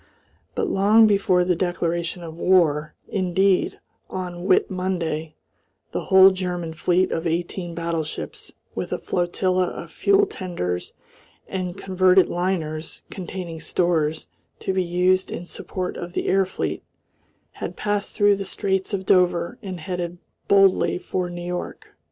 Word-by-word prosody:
But - - 0
long 210 +3 +5
before 195 -3 +3
the 180 0 +2
declaration 170 0 -1
of 160 -1 -8
war 160 -4 +2
indeed, 190 0 +1 0.3
on 180 -1 -5
Whit 185 - +3
Monday 165 -4 -2 0.6
the - - -3
whole 190 0 +8
German 180 -3 -3
fleet 180 +3 +1
of 165 +1 -1
eighteen 170 +1 -3
battleships, 165 -2 -4 0.2
with - - -4
a - - 0
flotilla 185 +1 0
of - - -7
fuel 400 0 +3
tenders 170 - -4 0.5
and 185 -1 -4
converted 185 -1 +4
liners 165 -3 -2
containing 180 -3 -6
stores 160 -3 0 0.4
to 190 - -1
be 185 -1 +1
used 180 +2 +2
in 175 - -5
support 180 +1 -5
of 175 0 -6
the - - -2
air 195 0 +3
fleet, 185 - -3 0.7
had - - -6
passed 205 -1 -2
through 205 -2 +4
the 195 - -3
straits 190 +1 -1
of 190 -1 -5
Dover 180 +4 +2
and 185 -5 -6
headed 175 0 -4 0.3
boldly 195 -2 +4
for 180 0 -3
New 175 0 -6
York. 180 0 -5
180 Hz, 140 wpm, -23 LUFS, 170-190 Hz, 0.7 s, whole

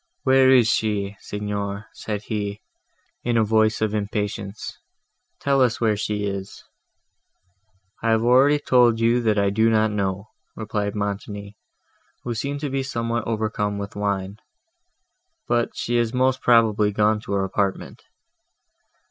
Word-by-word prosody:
"Where 130 0 +5
is 125 -4 +6
she? 105 -2 0
Signor," 105 0 -4
said 105 -1 -5
he, 105 -1 -3 0.6
in 120 -1 +1
a 115 - +4
voice 110 0 +2
of 110 -1 0
impatience: 105 -1 -4 0.6
"tell 140 -1 +2
us 120 -3 +2
where 110 -2 +2
she 105 0 -2
is." 100 -1 -5 1.4
"I 115 - 0
have 110 0 +3
already 130 +5 +5
told 125 -5 +3
you 115 +2 +3
that 110 -2 +1
I 100 -1 +2
do 110 +3 +3
not 110 -1 +2
know," 100 0 -2 0.3
replied 105 -1 -3
Montoni, 100 0 -4 0.7
who 120 - -3
seemed 140 +5 -3
to 145 - -2
be 135 0 0
somewhat 115 -3 -2
overcome 110 -2 -1
with 100 0 -6
wine; 100 -1 -2 1.1
"but 120 0 +1
she 120 0 -1
is 120 +1 0
most 130 0 +2
probably 110 -3 +4
gone 105 +1 +2
to 105 -2 -6
her 100 -1 +1
apartment." 95 0 -2
110 Hz, 140 wpm, -23 LUFS, 100-120 Hz, 1.4 s, is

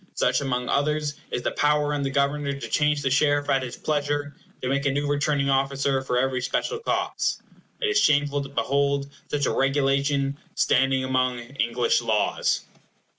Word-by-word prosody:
Such, 125 +1 +2
among 125 -2 -2
others, 150 +1 0 0.2
is 120 - -3
the - - 0
power 150 0 +1
in 145 - -1
the 135 - -1
Governor 140 +1 0
to 140 - -6
change 150 -1 +1
the 135 - 0
sheriff 145 +1 +2
at 135 - +3
his 125 -2 -5
pleasure, 145 -1 -2 0.2
and - - -35
to - - -1
make 140 +1 0
a - - +2
new 145 +2 -1
returning 145 -1 +1
officer 135 0 +1
for 125 -2 -1
every 130 0 0
special 450 - -2
cause. 460 - -1 0.4
It 455 - 0
is 405 -1 +3
shameful 145 - +2
to 135 - -7
behold 140 0 0 0.2
such 145 -1 -1
a - - +1
regulation 140 +1 +1 0.2
standing 135 0 +2
among 130 -1 0
English 120 -1 0
laws. - - +1
140 Hz, 175 wpm, -25 LUFS, 135-145 Hz, 0.4 s, at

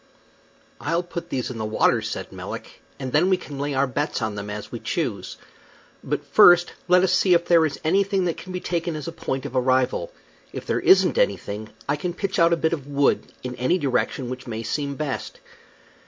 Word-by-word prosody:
"I'll 170 +1 0
put 175 -1 -7
these 130 -1 -2
in 115 - -7
the - - -2
water," 110 0 +2
said - - -5
Melick, - - -8 0.2
"and 130 -2 -4
then 160 +7 +3
we 185 - +4
can 145 -6 -9
lay 145 0 -2
our 135 +1 +3
bets 145 +3 -2
on 110 -1 -2
them 105 0 -6
as 105 0 -6
we - - -5
choose. - - -3 0.7
But - - -3
first 175 0 +6
let 180 0 +5
us 185 -1 +2
see 185 -1 +4
if 170 0 +2
there 165 -2 +5
is 140 - -7
anything 195 +3 +2
that 170 - 0
can 185 - -9
be 180 - -3
taken 170 -1 -2
as 150 0 -6
a - - -3
point 135 -5 -4
of - - -6
arrival. 130 - +1 0.4
If - - -6
there - - 0
isn't 385 +5 +5
anything, 110 - -1 0.2
I 145 +1 +1
can 175 +3 -4
pitch 195 +1 -2
out 170 0 +5
a 170 - +3
bit 160 0 +1
of 145 -4 -4
wood, 140 -1 +1
in 125 -1 -4
any 130 +9 +2
direction 130 -3 -1
which 130 0 -7
may 115 -1 -4
seem 140 +5 -2
best." 145 -2 -4
150 Hz, 215 wpm, -24 LUFS, 130-175 Hz, 0.7 s, first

